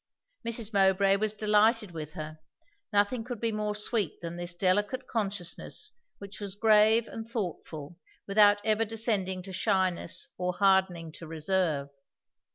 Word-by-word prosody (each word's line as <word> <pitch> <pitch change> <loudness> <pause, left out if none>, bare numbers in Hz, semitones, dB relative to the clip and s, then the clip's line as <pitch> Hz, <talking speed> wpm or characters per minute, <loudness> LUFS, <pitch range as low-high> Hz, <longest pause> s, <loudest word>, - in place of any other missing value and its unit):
Mrs. 230 -2 -1
Mowbray 195 0 +4
was 215 +1 0
delighted 215 0 +2
with 155 -2 -7
her; 155 0 -7 0.5
nothing 205 +3 +1
could 245 -1 -6
be 230 0 0
more 210 -1 -2
sweet 210 -4 -1
than 170 0 -6
this 175 0 -4
delicate 205 +8 +1
consciousness 205 - -2 0.3
which 200 0 -10
was 200 -2 -4
grave 220 +1 +4
and 225 0 -7
thoughtful 175 -7 -6 0.3
without 205 0 +5
ever 220 0 +3
descending 205 -4 0
to 190 0 -8
shyness 185 -2 0
or 180 0 -1
hardening 190 -4 +2
to 165 +1 -10
reserve. 160 -3 -1
200 Hz, 140 wpm, -29 LUFS, 180-215 Hz, 0.5 s, without